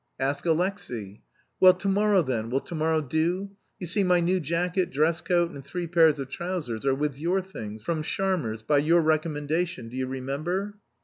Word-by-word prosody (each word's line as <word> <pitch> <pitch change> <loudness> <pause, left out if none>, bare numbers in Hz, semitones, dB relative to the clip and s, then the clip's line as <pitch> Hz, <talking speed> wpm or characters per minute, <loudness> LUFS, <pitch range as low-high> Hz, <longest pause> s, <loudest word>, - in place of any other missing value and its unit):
"Ask 140 +5 -1
Alexey." 160 - -2 0.4
"Well, 185 -1 +8
to - - -4
morrow, 200 -1 +3
then, 115 -5 -2
will 135 +3 0
to - - -9
morrow 160 0 +1
do? 170 +7 -1 0.3
You 180 - -6
see 195 +4 +2
my 180 -1 +4
new 180 +2 +2
jacket, 175 +3 0
dress 160 +4 +1
coat 175 0 +1
and 140 - -9
three 175 +6 -4
pairs 160 -3 +4
of 135 - -4
trousers 145 -7 -4
are 135 - +3
with 145 -1 -2
your 175 +5 +1
things, 110 - -8
from 160 +4 -1
Sharmer's, 160 - -1
by 145 +4 +3
your 165 +4 +4
recommendation, 155 -2 -1
do 120 - -10
you 130 0 -1
remember?" 155 +11 -3
160 Hz, 185 wpm, -26 LUFS, 135-180 Hz, 0.4 s, Well